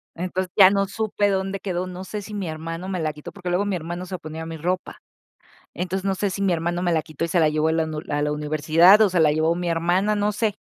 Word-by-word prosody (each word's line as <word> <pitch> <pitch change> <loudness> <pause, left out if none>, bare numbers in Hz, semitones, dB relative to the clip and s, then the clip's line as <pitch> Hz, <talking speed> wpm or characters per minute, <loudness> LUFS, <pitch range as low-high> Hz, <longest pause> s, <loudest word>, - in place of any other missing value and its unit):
Entonces, 180 +1 -3
ya 190 -2 +9
no 195 0 +1
supe 205 0 0
dónde 195 0 -1
quedó, 185 -2 -3
no 185 0 -7
sé 210 +2 -5
si 210 +2 -10
mi 200 -3 -3
hermano 165 +3 -6
me 185 -2 -2
la 155 -2 -1
quitó, 150 0 -10
porque 185 -3 -6
luego 180 +3 +1
mi 200 -2 -1
hermano 175 +2 -6
se 185 0 -5
ponía 160 +1 -7
mi 165 0 -6
ropa. 180 +4 -3 0.8
Entonces 185 +2 -3
no 195 -1 +1
sé 200 +1 -1
si 200 - -4
mi 195 -2 +2
hermano 175 +1 -1
me 175 - +1
la 160 - +2
quitó 155 0 -6
y - - -4
se 175 - +2
la 155 -2 +4
llevó 155 +1 +1
a - - +2
la 160 0 +1
uni 155 -1 -4
a 145 0 0
la 150 - 0
universidad 155 +6 +5
o 215 - +5
se 180 -1 0
la 155 -2 +5
llevó 160 +2 +1
mi 175 0 -2
hermana, 175 +5 +1
no 205 0 +1
sé. 210 0 0
180 Hz, 275 wpm, -23 LUFS, 160-195 Hz, 0.8 s, ya